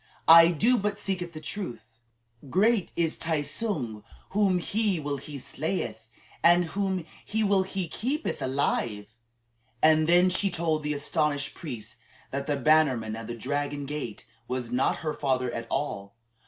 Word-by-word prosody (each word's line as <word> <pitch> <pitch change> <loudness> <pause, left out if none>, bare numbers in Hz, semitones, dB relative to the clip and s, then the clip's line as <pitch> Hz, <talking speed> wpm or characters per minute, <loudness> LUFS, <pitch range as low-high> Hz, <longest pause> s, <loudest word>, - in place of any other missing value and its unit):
"I 165 0 +10
do 220 +9 +3
but 205 0 -1
speak 185 -4 -3
the 155 - -8
truth. 150 - -5 0.6
Great 205 - +2
is 165 -2 0
Tai 160 -3 0
tsung. 145 - -3 0.3
Whom 195 -3 +3
he 200 0 0
will 145 -1 -3
he 145 +1 -8
slayeth, 120 - -4 0.4
and 175 +1 +6
whom 190 -4 -1 0.2
he 220 +1 -1
will 200 -2 +3
he 190 -1 -3
keepeth 270 - -3
alive." 115 -6 -1 0.7
And 155 +2 +4
then 175 +2 +6
she 195 +2 +2
told 165 -3 0
the 150 0 -2
astonished 145 -1 0
priest 120 -7 -8 0.3
that 140 +1 -3
the 145 -2 0
bannerman 135 -7 +3
of 115 -1 -7
the 120 - -5
Dragon 145 +3 -2
Gate 140 -7 -5 0.2
was 125 -2 -3
not 125 +2 +1
her 155 - 0
father 130 -3 0
at 115 -1 -5
all. 110 -8 -3
155 Hz, 155 wpm, -27 LUFS, 130-185 Hz, 0.7 s, I